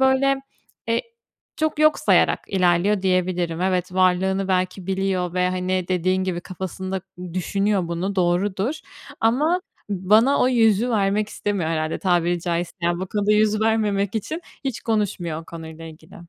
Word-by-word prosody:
böyle, 265 +1 +3 0.5
eee, 230 0 +1 0.5
çok 310 -1 -1
yok 310 0 +4
sayarak - - +3
ilerliyor, 185 +2 +2
diyebilirim. 180 -2 0
Evet 180 -1 0
varlığını 190 +1 +2
belki 185 0 -1
biliyor 190 -2 -1
ve, 180 0 +2
hani, 185 0 -1
dediğin 185 +1 +1
gibi 180 -2 -2
kafasında 190 +1 -5 0.3
düşünüyor 195 0 0
bunu 180 +4 -3
doğrudur 190 - +1 0.5
ama 300 +11 +2 0.3
bana 210 +8 +3
o 250 - +4
yüzü 230 -1 +3
vermek 210 -1 +1
istemiyor 200 -7 -2
herhâlde, 155 -1 -1
tabiri 175 -1 +1
caizse, 170 0 -2
yani, 175 +1 0
bu 190 - -3
konuda 205 +2 +1
yüz 215 0 +3
vermemek 210 -2 +1
için 265 - -3 0.2
hiç 265 -4 -3
konuşmuyor 180 -7 -1
o - - -18
konuyla 160 -1 -9
ilgili. 160 +2 -13
190 Hz, 145 wpm, -22 LUFS, 180-210 Hz, 0.5 s, yok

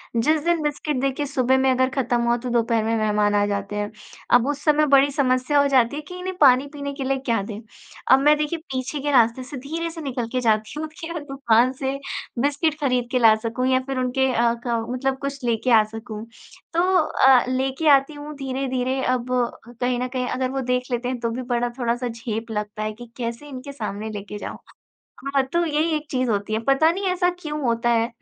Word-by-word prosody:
जिस 300 +6 +2
दिन 340 -1 +2
बिस्किट 295 -2 -2
देखिए 275 +2 -1
सुबह 265 -2 +2
में 265 0 +3
अगर 260 +1 +2
ख़त्म 245 -3 +1
हुआ 235 0 +2
तो 245 +1 -5
दोपहर 230 -1 +1
में 225 +1 0
मेहमान 210 -1 +1
आ 205 - +3
जाते 200 0 -3
हैं। 205 +1 -2 0.4
अब 245 +1 +5
उस 290 0 -3
समय 300 0 +4
बड़ी 280 0 +5
समस्या 265 0 +2
हो 280 - +3
जाती 255 -1 +3
है 300 - -4
कि 330 +5 -10
इन्हें 370 0 -4
पानी 265 0 +6
पीने 280 -1 -5
के 275 -1 -5
लिए 270 +1 0
क्या 230 -4 +1
दें 205 +1 -6 0.5
अब 265 - +8
मैं 295 +2 +5
देखिए 300 +2 -2
पीछे 260 +3 -3
के 290 +1 -1
रास्ते 240 -1 +3
से 270 +2 -8
धीरे 320 +6 -4
से 325 0 -8
निकल 250 -5 -3
के 255 - +1
जाती 220 +4 0
हूँ 315 - -3
कि 330 0 -6
वो 335 - -3
दुकान 255 -4 +2
से 270 +1 -1 0.4
बिस्किट 290 +3 0
ख़रीद 250 -3 +1
के 255 - +2
ला 225 -2 +7
सकूँ 255 +3 -1
या 260 0 +3
फ़िर 270 -1 -3
उनके 255 +1 +1
अ, 235 0 +3
क 230 -1 -1
मतलब 265 +1 -1
कुछ 275 -1 -5
लेके 235 +1 0
आ 220 -2 +7
सकूँ। 220 0 -8 0.5
तो 340 - +2 0.2
अ, 265 -4 +4
लेके 265 +4 -1
आती 275 +1 +4
हूँ 295 +1 -8
धीरे-धीरे। 260 -1 -2
अब 250 -1 0 0.6
कहीं 250 -1 0
न 250 - -1
कहीं 250 -1 -1
अगर 255 0 -1
वो 270 0 -2
देख 250 0 0
लेते 245 0 -1
हैं 255 -1 -3
तो 230 0 -1
भी 250 - -4
बड़ा 245 -1 -1
थोड़ा-सा 240 +1 -1
झेप 230 -1 -5
लगता 210 0 -4
है 215 0 -3
कि 240 +3 -11
कैसे 235 +3 -5
इनके 265 +1 -7
सामने 215 -5 -5
लेके 205 -1 -7
जाऊँ। - - -6 0.8
हाँ, 275 - +5
तो 340 0 +3
यही 315 +1 0
एक 300 0 -3
चीज़ 255 -2 0
होती 205 0 -1
है। 220 - +1
पता 275 +4 +5
नहीं 390 +3 -4
ऐसा 360 0 +2
क्यों 300 -3 -4
होता 235 -2 +1
है 230 0 +2
255 Hz, 225 wpm, -23 LUFS, 235-280 Hz, 0.8 s, अब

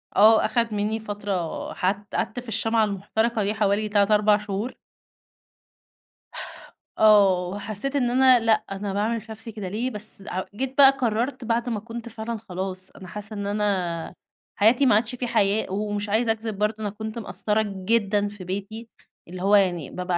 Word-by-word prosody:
آه، 220 +2 +6
أخد 230 -3 0
منّي 210 +2 -1
فترة 205 -5 -4
ح 185 - +1 0.2
قعدت 245 - -2
في 245 - -11
الشمعة 225 +1 +1
المحترقة 215 +3 -1
دي 205 +2 0
حوالي 210 0 +1
3، 205 0 +2
4 210 0 +5
شهور. 210 +4 -4 2.2
آه 195 -4 +5
وحسّيت 210 +7 -3
إن 245 -3 +2
أنا 255 0 +5
لأ، 225 -1 +2
أنا 195 0 -4
باعمل 220 +2 0
في 220 +1 -12
نفسي 220 +1 -8
كده 205 -3 -6
ليه؟ 225 +6 -2
بس 210 -2 -4
هأ 185 -2 -4
جيت 265 +3 -4
بقى 275 -1 +9
قررت 245 0 -1
بعد 235 +2 0
ما 220 -3 -2
كنت 235 +1 -8
فعلًا 225 +1 -5
خلاص، 185 0 -5
أنا 185 - -12
حاسة 210 +3 -7
إن 205 -1 -4
أنا 190 -5 -1 0.4
حياتي 235 +7 +4
ما 225 - +5
عادش 245 +3 0
في 245 0 -3
حياة، 205 -3 +1
ومش 205 +1 -2
عايزة 225 +2 +2
أكذب 220 -2 -4
برضه 210 +1 0
أنا 210 - -2
كنت 220 +2 -6
مقصرة 215 0 0 0.2
جدًا 205 -2 +2
في 205 -2 -9
بيتي، 200 +5 -6 0.4
اللي 180 +1 -8
هو 200 +2 +4
يعني 175 -7 +2
بابقى 180 -1 -2
210 Hz, 175 wpm, -24 LUFS, 200-230 Hz, 2.2 s, بقى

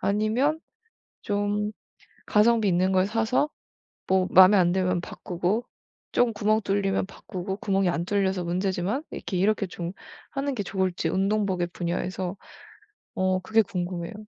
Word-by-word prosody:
아니면 220 +9 +1 0.6
좀 205 0 -1 0.5
가성비 220 0 +3
있는 185 +1 +2
걸 185 0 +3
사서 225 +7 +1 0.6
뭐 190 -1 +2
마음에 190 +2 +8
안 175 -2 +4
들면 180 -1 +1
바꾸고 180 +7 -2 0.5
쫌 245 -1 +3
구멍 215 0 +2
뚫리면 195 -1 0
바꾸고 190 0 -6
구멍이 195 -2 +1
안 170 0 -1
뚫려서 190 -2 0
문제지만 185 - -1
이렇게, 185 - -4
이렇게 200 +1 +1
좀 170 -1 -5 0.4
하는 275 -1 -2
게 205 - -2
좋을지 185 -3 -1
운동복의 195 -2 0
분야에서 180 +1 -3 0.8
어 185 0 +1
그게 220 +4 +3
궁금해요. 180 -1 -4
195 Hz, 295 characters per minute, -26 LUFS, 180-210 Hz, 0.8 s, 마음에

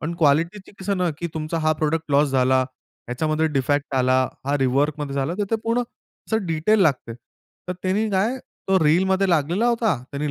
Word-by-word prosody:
पण 170 +3 -3
क्वालिटीचं 165 +7 +1
कसं 200 +1 -1
ना, 180 -2 +1
की 170 - -3
तुमचा 160 +1 -3
हा 155 0 +2
प्रॉडक्ट 155 0 -2
लॉस 145 +1 +4
झाला, 130 0 +3 0.5
ह्याच्यामध्ये 155 +6 0
डिफेक्ट 145 0 -1
आला, 130 0 +3 0.3
हा 145 +1 +1
रिवर्कमध्ये 140 +2 0
झालं. 140 +5 -1
तर 205 - +1
ते 225 - +2
पूर्ण 230 +2 +1 0.5
अस - - +4
डिटेल 165 +7 +2
लागते. 135 -8 0 0.5
तर 180 - 0
त्यांनी 205 +4 0
काय 200 +7 +1 0.3
तो 190 0 +4
रीलमध्ये 190 +5 +3
लागलेला 170 +8 +1
होता. 230 -7 +1
त्याने 145 +1 -3
155 Hz, 175 wpm, -22 LUFS, 145-190 Hz, 0.5 s, लॉस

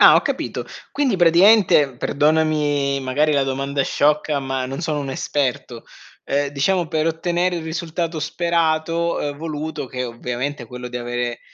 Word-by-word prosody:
Ah, - - +9
ho - - +6
capito, - - -3 0.3
quindi, 270 -8 +1
praticamente, 170 - +5
perdonami, 145 -1 +1
magari, 145 +4 +1
la 140 -1 +3
domanda 135 +1 -1
sciocca, 150 +1 +1
ma 135 -1 -2
non 135 +4 -5
sono 155 -3 -1
un 135 -1 -4
esperto, 130 -4 -2 0.4
uhm, 145 +1 +1
diciamo 165 +5 0
per 160 -1 -1
ottenere 175 +2 0
il 165 - -5
risultato 165 0 -3
sperato, 170 0 0
uhm, 145 -1 -3
voluto, 155 -2 -5
che 125 0 -4
ovviamente 125 +3 -4
è - - -10
quello 125 0 -7
di 125 - -6
avere, 120 0 -3
150 Hz, 155 wpm, -21 LUFS, 135-165 Hz, 0.4 s, Ah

